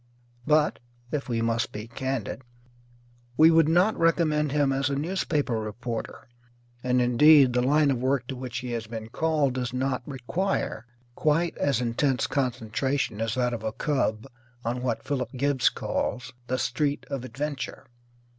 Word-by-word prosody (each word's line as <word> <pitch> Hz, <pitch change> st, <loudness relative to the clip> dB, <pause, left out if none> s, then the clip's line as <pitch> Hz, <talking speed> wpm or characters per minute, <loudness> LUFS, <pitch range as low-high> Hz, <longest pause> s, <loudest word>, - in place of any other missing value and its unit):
But 150 Hz, 0 st, +3 dB, 0.3 s
(if 145 Hz, -2 st, -3 dB
we 115 Hz, -1 st, 0 dB
must 115 Hz, -1 st, 0 dB
be 105 Hz, +1 st, -6 dB
candid) 130 Hz, 0 st, -3 dB, 1.0 s
we 160 Hz, +1 st, +7 dB
would 165 Hz, -1 st, +5 dB
not 180 Hz, +6 st, +4 dB
recommend 155 Hz, -3 st, +2 dB
him 145 Hz, -1 st, +2 dB
as 135 Hz, +1 st, 0 dB
a 140 Hz, -, -1 dB
newspaper 150 Hz, -6 st, -1 dB
reporter. 110 Hz, +2 st, -5 dB, 0.6 s
And, 125 Hz, 0 st, +2 dB
indeed, 130 Hz, +2 st, +6 dB
the 125 Hz, -, +2 dB
line 145 Hz, +3 st, +3 dB
of 130 Hz, -, -1 dB
work 130 Hz, -1 st, +1 dB
to 135 Hz, -, -3 dB
which 125 Hz, -1 st, -5 dB
he 125 Hz, 0 st, -4 dB
has 115 Hz, -2 st, -3 dB
been 110 Hz, 0 st, -7 dB
called 150 Hz, -1 st, +1 dB
does 125 Hz, -1 st, -3 dB
not 130 Hz, 0 st, -1 dB
require 140 Hz, -, -2 dB, 0.3 s
quite 160 Hz, +6 st, +1 dB
as 140 Hz, -4 st, +1 dB
intense 125 Hz, +2 st, +1 dB
concentration 130 Hz, -2 st, -1 dB
as 115 Hz, -1 st, -1 dB
that 125 Hz, -1 st, +1 dB
of 115 Hz, -, -4 dB
a 110 Hz, 0 st, -3 dB
cub 120 Hz, -7 st, -1 dB, 0.4 s
on 120 Hz, +2 st, -1 dB
what 120 Hz, -3 st, -2 dB
Philip 130 Hz, -4 st, -3 dB
Gibbs 135 Hz, 0 st, +2 dB
calls 125 Hz, +1 st, -3 dB
"The 130 Hz, -, 0 dB
Street 145 Hz, +1 st, -1 dB
of 135 Hz, -3 st, -3 dB
Adventure." 140 Hz, +2 st, -5 dB
130 Hz, 155 wpm, -26 LUFS, 120-150 Hz, 1.0 s, we